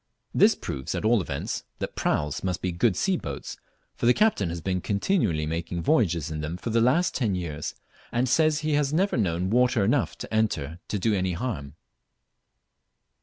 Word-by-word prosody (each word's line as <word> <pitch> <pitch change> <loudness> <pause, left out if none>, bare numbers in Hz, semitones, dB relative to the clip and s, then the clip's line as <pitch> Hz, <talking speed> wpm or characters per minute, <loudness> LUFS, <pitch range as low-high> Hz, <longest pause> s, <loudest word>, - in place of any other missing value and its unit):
This - - +5
proves 65 -1 -4
at - - -2
all 115 -1 +4
events 80 - -4
that - - -5
praus 75 -1 -1
must 90 -2 -2
be 90 - 0
good 90 +4 +2
sea 190 -2 +1
boats, 70 - -6 0.4
for - - -1
the 125 - +6
captain 210 - +2
has 85 +1 -4
been 90 +2 -1
continually 100 - +1
making 85 +2 -3
voyages 85 - +2
in 75 -1 -3
them 80 +3 -4
for 115 - -4
the 115 +1 +3
last 135 +10 +3
ten 110 -8 0
years, 80 -5 -4 0.4
and 120 +2 +1
says 155 +3 +3
he 155 -1 0
has 145 -1 +2
never 190 +6 +1
known 90 -3 0
water 125 -2 +3
enough 120 +5 +1 0.2
enter 85 -8 0
to 105 - -2
do 105 +3 +1
any 95 -2 0
harm. 85 - -4
100 Hz, 180 wpm, -26 LUFS, 85-125 Hz, 0.4 s, the